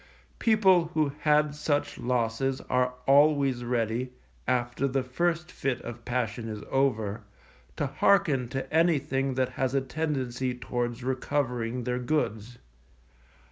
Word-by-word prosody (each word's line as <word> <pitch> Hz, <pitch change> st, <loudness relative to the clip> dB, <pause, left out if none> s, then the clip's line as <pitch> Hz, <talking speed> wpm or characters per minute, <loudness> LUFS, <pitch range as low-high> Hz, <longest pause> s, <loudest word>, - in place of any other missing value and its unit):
People 190 Hz, -6 st, +4 dB
who 155 Hz, -2 st, +2 dB
had 150 Hz, -1 st, +3 dB
such 145 Hz, -1 st, -1 dB
losses 125 Hz, +2 st, 0 dB
are 125 Hz, 0 st, +2 dB
always 140 Hz, -3 st, +4 dB
ready, 120 Hz, +1 st, -1 dB, 0.4 s
after 125 Hz, +2 st, 0 dB
the 135 Hz, 0 st, 0 dB
first 170 Hz, +6 st, -1 dB
fit 135 Hz, -6 st, -2 dB
of 120 Hz, 0 st, -8 dB
passion 120 Hz, -2 st, -2 dB
is 105 Hz, -1 st, -6 dB
over, 115 Hz, -6 st, +1 dB, 0.5 s
to -, -, -1 dB
hearken 150 Hz, -11 st, +2 dB
to 135 Hz, +2 st, -4 dB
anything 140 Hz, -5 st, +2 dB
that 130 Hz, -1 st, +1 dB
has 130 Hz, +1 st, -2 dB
a 135 Hz, -, +3 dB
tendency 130 Hz, -4 st, -2 dB
towards 120 Hz, 0 st, -3 dB
recovering 125 Hz, -2 st, -1 dB
their 125 Hz, +1 st, -1 dB
goods. 120 Hz, -4 st, -2 dB
130 Hz, 125 wpm, -28 LUFS, 120-145 Hz, 0.5 s, People